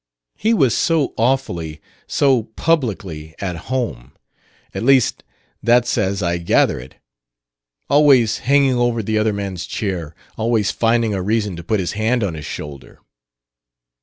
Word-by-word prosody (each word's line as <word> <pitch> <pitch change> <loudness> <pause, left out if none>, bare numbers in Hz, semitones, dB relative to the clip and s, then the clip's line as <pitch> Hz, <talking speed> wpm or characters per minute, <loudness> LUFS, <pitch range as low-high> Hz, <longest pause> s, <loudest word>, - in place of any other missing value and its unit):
He 220 - 0
was 130 - +3
so 160 -5 +1
awfully, 90 - -1 0.3
so 130 -6 +2
publicly, 100 - -1
at 95 -3 -3
home; 110 - -3 0.6
at - - -4
least 130 +1 +3 0.4
that's 120 0 +3
as 100 -2 0
I 85 0 0
gather 85 - +2
it. 65 +2 -12 0.9
Always 140 -6 +4
hanging 135 -1 +3
over 120 -2 +1
the 110 +1 0
other 110 0 +2
man's 100 -3 -4
chair; 90 -7 -4 0.2
always 110 -2 +1
finding 115 -1 +1
a 95 - -2
reason 105 -1 -1
to 85 - -8
put 110 +4 0
his 90 - -2
hand 110 +3 0
on 95 -5 -1
his 75 -2 -7
shoulder...." 70 -3 -8
110 Hz, 140 wpm, -19 LUFS, 90-125 Hz, 0.9 s, Always